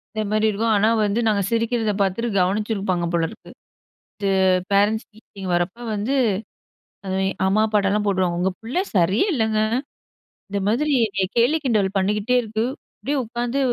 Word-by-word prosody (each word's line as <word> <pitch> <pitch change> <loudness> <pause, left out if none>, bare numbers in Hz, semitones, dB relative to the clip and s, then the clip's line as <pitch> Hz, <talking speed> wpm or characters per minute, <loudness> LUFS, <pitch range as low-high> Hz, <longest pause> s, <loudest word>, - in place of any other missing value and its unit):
இந்த 215 - 0
மாரி 215 0 +2
இருக்கும். 220 +2 0
ஆனா, 205 +2 +3 0.2
வந்து 205 +3 0
நாங்க 210 -2 +2
சிரிக்கிறத 230 -1 0
பாத்துட்டு 200 +5 0
கவனிச்சிருப்பாங்க 195 -2 0
போலிருக்கு. 170 +6 -3 0.7
இது 200 - -1 0.4
பேரன்ட்ஸ் 205 +3 +2
மீட்டிங் 200 -3 -9
வரப்ப 175 +5 -1 0.2
வந்து 210 +6 -1 0.9
அது 190 0 -2 0.3
அம்மா, 200 +3 +3
அப்பாட்டெல்லாம் 210 -1 +1
போடுவுடுவாங்க 185 -4 0
"உங்க 190 +1 +1
பிள்ளை 250 +11 -1
சரியே 185 - +3
இல்லங்க. 220 -6 +1 0.9
இந்த 200 0 -2
மாதிரி 290 +7 +1 0.4
கேலி, 240 +7 +3
கிண்டல் 215 -6 +2
பண்ணிக்கிட்டே 210 +5 +1
இருக்கு. 220 0 -2 0.3
அப்படியே 285 +1 -2
உட்காந்து 240 +3 -2
210 Hz, 135 wpm, -22 LUFS, 195-230 Hz, 0.9 s, ஆனா